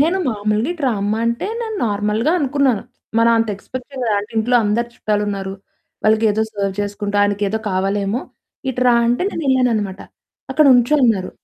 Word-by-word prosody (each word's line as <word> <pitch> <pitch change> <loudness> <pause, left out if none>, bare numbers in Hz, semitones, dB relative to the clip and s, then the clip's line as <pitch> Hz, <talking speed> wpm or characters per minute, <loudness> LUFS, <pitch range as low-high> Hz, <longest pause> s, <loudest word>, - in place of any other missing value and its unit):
నేను 335 +6 +3
మామూలుగా 215 +5 0
ఇటు 335 -4 -10
రామ్మా 210 -2 0
అంటే 235 +7 -1
నేను 445 -2 -4
నార్మల్‌గా 210 +7 0
అనుకున్నాను. 275 - +1 0.4
మరంత 230 -1 +3
ఎక్స్‌పెక్ట్ 250 +5 -8
చేయలేదు 245 -5 -1
అంటే 205 +1 -6
ఇంట్లో 245 +3 +2
అందరూ 230 +3 0
చుట్టాలున్నారు. 205 -3 -2 0.5
వాళ్ళకెదో 220 0 +3
సర్వ్ 200 -2 -2
చేసుకుంటూ 205 0 -3
ఆయనకేదో 205 +1 0
కావాలేమో 195 +4 0 0.5
ఇటు 250 0 -2
రా 245 - +6
అంటే 240 +7 +1
నేన్నేళ్ళాననమాట. 250 - 0 0.5
"అక్కడ 305 +3 +3
నుంచో 245 +4 +3
అన్నారు" 205 -6 +1
220 Hz, 140 wpm, -19 LUFS, 205-250 Hz, 0.5 s, రా